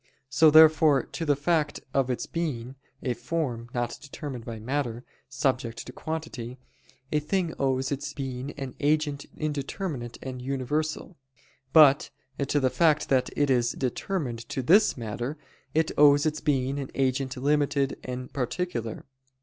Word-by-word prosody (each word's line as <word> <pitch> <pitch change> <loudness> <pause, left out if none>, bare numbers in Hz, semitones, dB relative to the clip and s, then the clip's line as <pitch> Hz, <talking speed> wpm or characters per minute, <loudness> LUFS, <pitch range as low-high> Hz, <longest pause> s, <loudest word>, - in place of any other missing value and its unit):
So 155 +4 +6
therefore 155 -3 +7
to 165 - -5
the 145 -2 +3
fact 150 0 0
of 135 -2 +2
its 125 - -1
being 135 -7 -3 0.3
a 125 - 0
form 120 -6 -3
not 120 -1 -2
determined 140 -4 -7
by 115 -2 -5
matter 120 0 -2 0.3
subject 130 -3 -1
to - - -8
quantity, 155 -7 -5 0.5
a 150 - +2
thing 170 +2 -1
owes 135 0 0
its 140 0 -3
being 130 -1 -5
an 135 -3 -6
agent 150 -1 0
indeterminate 145 - -3
and 130 -1 -6
universal: 145 +6 -2 0.5
but 145 -3 +7 0.4
to 145 - +2
the 130 -2 +2
fact 155 -3 +3
that 130 -2 +2
it 145 -2 +3
is 120 -1 +2
determined 130 -2 -3
to 130 - -2
this 195 - +5
matter, 120 +5 -4 0.4
it 160 0 +2
owes 145 0 +7
its 155 0 -1
being 135 -1 0
an 135 - -5
agent 130 0 0
limited 145 0 +1
and 125 0 -6
particular. 125 -3 -3
140 Hz, 145 wpm, -27 LUFS, 125-150 Hz, 0.5 s, therefore